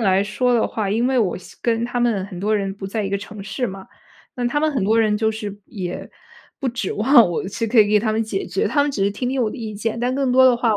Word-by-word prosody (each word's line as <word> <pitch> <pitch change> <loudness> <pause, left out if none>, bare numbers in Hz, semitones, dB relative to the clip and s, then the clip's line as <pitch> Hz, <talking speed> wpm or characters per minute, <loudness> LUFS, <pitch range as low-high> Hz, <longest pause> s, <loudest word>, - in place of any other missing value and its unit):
来 195 -3 +3
说 245 +4 +1
的 230 - +2
话， 215 -3 -2
因 230 +4 +1
为 265 -1 +2
我 205 -6 +1
现 185 - -14
跟 230 0 0
他 245 0 -2
们 230 -6 +1
很 185 -3 -9
多 210 +4 0
人 195 -1 -2
不 195 -1 -7
在 210 +2 -2
一 195 - -3
个 200 - 0
城 205 0 -9
市 245 +5 -3
嘛， 190 -2 -8 0.5
那 245 -2 -2
他 295 +5 0
们 310 0 +2
很 255 -9 0
多 220 +3 +3
人 215 -2 +3
就 220 +1 +1
是 205 -2 -6
也 180 -3 -6 0.5
不 270 - 0
指 235 -5 -3
望 235 -1 +5
我 175 - -2
是 225 +3 -3
可 225 +1 +5
以 205 - +4
给 210 0 +4
他 215 0 0
们 225 - +1
解 305 - -3
决， - - -1
他 285 - +2
们 290 - 0
只 205 - -2
是 200 - +2
听 245 +5 -3
听 260 -1 0
我 215 - 0
的 - - -8
意 220 -3 -6
见， 225 +2 -3
但 245 +2 0
更 270 -1 0
多 260 +1 +6
的 250 -2 +6
话 230 -3 +2
220 Hz, 320 characters per minute, -21 LUFS, 205-245 Hz, 0.5 s, 多